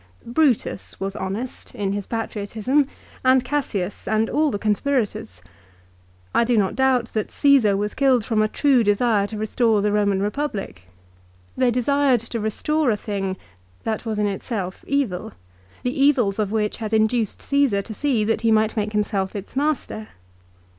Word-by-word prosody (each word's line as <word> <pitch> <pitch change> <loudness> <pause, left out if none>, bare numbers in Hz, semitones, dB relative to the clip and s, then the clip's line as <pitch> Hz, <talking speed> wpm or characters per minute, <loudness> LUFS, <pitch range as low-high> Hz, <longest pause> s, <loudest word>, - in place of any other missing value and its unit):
Brutus 245 -5 0
was 195 0 -3
honest 215 +7 -5
in 200 -4 -1
his 200 -1 -4
patriotism, 225 +5 -1 0.4
and 260 0 +4
Cassius, 225 -9 -2
and 220 +1 +1
all 305 +1 +2
the 205 - -2
conspirators. 210 - -1 0.9
I - - +4
do 235 0 +2
not 195 -3 +1
doubt 255 -2 +2
that 215 -2 -1
Caesar 265 -9 +4
was 210 +1 -2
killed 260 -5 +3
from 220 -2 +1
a 215 - +3
true 265 +1 +3
desire 205 0 +2
to 215 - -7
restore 220 0 +1
the 210 - +2
Roman 205 -2 +2
Eepublic. 205 - -3 0.7
They 255 -1 +3
desired 255 +1 +2
to 230 0 -5
restore 280 +7 0
a 215 - +2
thing 195 -2 -3 0.5
that 220 -1 -2
was 220 -3 -3
in 210 - +1
itself 195 -1 -4
evil, 255 - -1 0.5
the 255 +3 -1
evils 245 -9 +3
of 205 -2 0
which 215 -1 0
had 220 -1 -5
induced 220 0 +1
Caesar 275 -8 +2
to 220 - -8
see 255 -2 0
that 220 +1 0
he 230 - +2
might 220 0 +2
make 210 -1 -2
himself 205 -2 -1
its 200 +3 -7
master. 275 -6 -1
220 Hz, 160 wpm, -22 LUFS, 205-255 Hz, 0.9 s, and